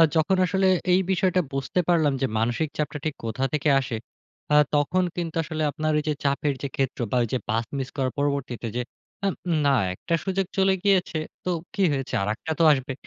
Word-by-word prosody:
যখন 165 +4 +3
আসলে 190 +1 +2 0.2
এই 180 - +5
বিষয়টা 185 -1 +2
বুঝতে 135 +6 -1
পারলাম 155 -5 +3
যে, - - +3
মানসিক 120 +7 0
চাপটা 150 -1 -2
ঠিক 155 -2 -1
কোথা 115 +4 -2
থেকে 150 0 +1
আসে, 130 -3 -3 0.6
আ - - +6 0.2
তখন 150 +6 +2
কিন্তু 170 -2 -3
আসলে 155 0 -4
আপনার 155 +2 -1
ওইযে 150 0 0
চাপের 140 +1 +1
যে, 140 - -2
ক্ষেত্র 135 -2 -1
বা - - +1
ওইযে 120 +3 -1
পাথ 115 +2 +1
মিস 135 -1 -3
করার 130 -2 0
পরবর্তীতে 140 -4 -1
যে, 125 - 0 0.4
অ্যাম 195 -2 +1 0.3
না - - +5 0.2
একটা 130 - -4
সুযোগ 190 0 0
চলে 190 0 +4
গিয়েছে 190 -5 +2 0.3
তো - - -2 0.2
কি 200 - -2
হয়েছে? 135 -2 -3
আরেকটা 110 +10 -3
তো - - +5
আসবে। 135 -1 0
150 Hz, 190 wpm, -25 LUFS, 135-180 Hz, 0.6 s, আ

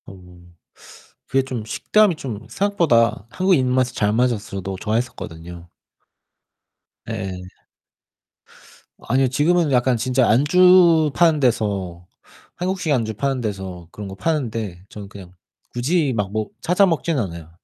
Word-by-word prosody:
음. 90 -2 -16 0.7
그게 135 0 +1
좀 125 -4 -5
식감이 210 - +2
좀 110 -8 -7
생각보다 135 - +1
한국인 180 -3 +2
입맛에 125 -1 +1
잘 105 -3 0
맞아서 120 0 +2 0.2
저도 95 0 -5
좋아했었거든요. 85 -7 -5 1.4
예. 95 -5 -5 1.6
아니요. 130 +3 +1
지금은 155 +4 +1
약간 125 -1 +2
진짜 125 +2 +1
안주 165 +4 +5
파는 165 -3 +3
데서 100 -9 -1 0.5
한국식 180 -2 -2
안주 115 -4 -1
파는 135 +2 -1
데서 95 -5 -6
그런 105 -1 -8
거 95 - -8
파는데 110 - -3
저는 100 -2 -10
그냥 95 -3 -12 0.4
굳이 140 +3 0
막 100 -3 -2
먹 110 0 -3
찾아 180 +7 +3
먹진 165 -3 0
않아요. 85 - -5
120 Hz, 265 characters per minute, -21 LUFS, 100-150 Hz, 1.6 s, 안주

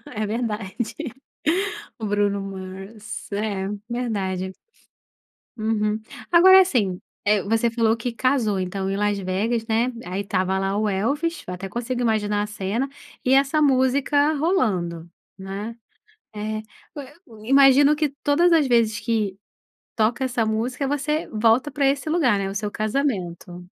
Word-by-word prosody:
É 215 - -1
verdade. 215 -3 -3 1.2
O 220 - -4
Bruno 205 -1 +1
Mars, 195 +3 -8
é, 200 -2 -2 0.2
verdade. 195 -6 -2 1.1
Uhum. 215 -1 0 0.3
Agora 375 +2 +8
assim, 215 - 0 0.2
eh, 205 -1 +3
você 225 +3 +1
falou 225 -1 +2
que 240 +2 -3
casou 230 -5 +1
então 190 +1 -3
em 195 - -1
Las 205 0 +1
Vegas, 210 +5 -1
né, 230 +3 +1
aí 185 +2 -3
estava 190 -1 0
lá 195 +1 -1
o 215 0 +1
Elvis, 285 - -1
eu 180 - -4
até 190 +2 -6
consigo 245 +2 -3
imaginar 210 -3 +1
a - - -4
cena, 210 +6 -2 0.4
e 255 - +4
essa 275 +3 +3
música 280 +2 +3
rolando, 185 - 0 0.3
né. 195 +4 -6 0.6
Eh, 215 +1 -3
e 215 - -8 0.6
o 215 -2 -14
imagino 275 +2 +6
que 305 0 +1
todas 340 +5 +3
as 320 -4 +4
vezes 230 -4 +2
que 210 -3 -1 0.6
toca 235 +3 +1
essa 245 -3 0
música 240 +5 -1
você 295 +2 -1
volta 230 +6 +3
para 280 -1 +1
esse 275 +2 -1
lugar, 280 -11 +3
né, 195 -1 -2
o 195 - -6
seu 205 0 -2
casamento. 190 - -3
220 Hz, 145 wpm, -23 LUFS, 200-260 Hz, 1.2 s, Agora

